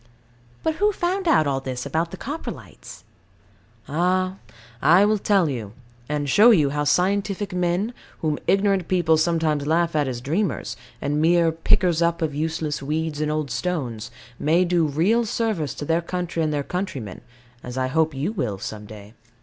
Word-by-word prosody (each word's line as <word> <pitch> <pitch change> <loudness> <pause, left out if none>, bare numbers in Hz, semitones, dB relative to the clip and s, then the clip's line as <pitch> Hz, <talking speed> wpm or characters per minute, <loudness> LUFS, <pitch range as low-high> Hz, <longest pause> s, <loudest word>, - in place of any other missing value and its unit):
But 320 0 0
who 415 +3 +3
found 375 0 -1
out 280 - +4
all 135 -2 0
this 130 -1 -5
about 160 +4 -1
the 190 - -8
Coprolites? 295 - -8 0.8
Ah 185 +4 0 0.4
I 175 +8 +6
will 210 0 +2
tell 195 -4 +3
you; 115 -8 -4 0.4
and 150 -1 -1
show 210 - +6
you 155 -11 +4
how 145 0 -1
scientific 195 +5 +1
men, 180 +5 0 0.3
whom 155 -2 0
ignorant 195 -2 +2
people 175 -3 +3
sometimes 155 -3 +1
laugh 165 +1 +1
at 145 -2 +2
as 125 -2 -3
dreamers, 140 - -2 0.3
and 145 +2 0
mere 170 0 +4
pickers 165 +1 +2
up 170 0 +1
of 155 -2 -1
useless 155 0 -2
weeds 155 +1 -2
and 150 0 0
old 150 -3 -2
stones, 120 -12 -3 0.3
may 165 +5 +3
do 170 -2 +2
real 180 +11 +2
service 215 - -1
to 145 - -5
their 165 +2 +1
country 175 -1 -3
and 155 -1 +1
their 145 -1 -1
countrymen, 140 - -5 0.4
as 125 +1 -7
I 130 - +1
hope 160 +3 +1
you 145 +9 -1
will 120 - -2
some 105 +2 -7
day. 105 0 -12
160 Hz, 170 wpm, -23 LUFS, 145-185 Hz, 0.8 s, I